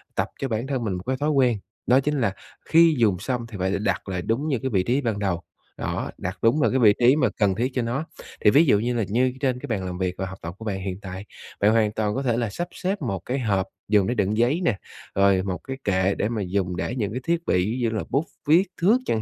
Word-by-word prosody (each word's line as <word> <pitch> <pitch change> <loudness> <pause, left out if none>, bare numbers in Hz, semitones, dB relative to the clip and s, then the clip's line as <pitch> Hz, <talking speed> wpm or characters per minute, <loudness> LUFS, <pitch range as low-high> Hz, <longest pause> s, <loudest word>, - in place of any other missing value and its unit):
tập - - +1
cho 135 - -1
bản 115 +1 -2
thân 135 -3 -2
mình 105 -4 -1
một 90 0 -5
cái 130 +4 -1
thói 145 +3 0
quen, 130 -6 +3 0.3
đó 125 +2 +6
chính 145 0 0
là 100 -5 +1 0.3
khi 165 -1 +5
dùng 105 -7 +2
xong 120 +3 -2
thì 110 -3 -8
phải 95 +1 0
là 100 - 0
đặt 100 -2 -1
lại 90 -2 -2
đúng 115 - -1
như 135 -6 0
cái 130 - -2
vị 95 -6 +1
trí 125 +7 +1
ban 115 -6 -1
đầu, 95 -4 -1 0.4
đó, - - -3
đặt 95 +2 -4
đúng 115 +7 +3
lại - - +3
cái 130 - +2
vị 105 -4 +6
trí 125 +3 +6
mà 130 -6 +2
cần 100 -3 +2
thiết 125 +6 -1
cho 125 - 0
nó. 125 +7 -2 0.4
Thì - - +6
ví 145 +9 +6
dụ 105 -8 +4
như 120 +3 -1
là 115 - +1
như 125 +5 +1
trên 130 -3 0
cái - - -7
bàn 100 -5 -2
làm 90 -1 -4
việc 90 -1 -1
và 95 - -2
học 95 0 -8
tập 85 +1 -6
của 110 - -9
bạn 100 -3 -2
hiện 95 0 -4
tại, 95 0 -7 0.3
bạn 105 +2 +4
hoàn 110 -2 +3
toàn 105 -1 -1
có 135 - -1
thể 120 -3 +1
là 120 -2 0
sắp 175 - -4
xếp 195 +2 -3
một 95 -1 -2
cái 130 +3 -1
hộp 100 -6 0 0.2
dùng 100 -2 +3
để 120 - +1
đựng 105 -1 0
giấy 125 +9 +2
nè, 110 - +2 0.4
rồi 100 -1 +4
một 95 -2 -2
cái 135 0 -5
kệ 95 0 +1
để 105 - -1
mà 115 -3 -2
dùng 90 -1 -1
để 115 - -3
những 105 -6 -2
cái 125 +4 -4
thiết 170 +2 -1
bị, - - +2 0.2
ví 125 - -3
dụ 115 - +2
như 110 - -4
là - - -2
bút, 145 +4 +1 0.2
viết, 165 +5 +6 0.2
thước 205 +8 +5
chẳng 110 - 0
115 Hz, 290 wpm, -24 LUFS, 100-130 Hz, 0.4 s, đó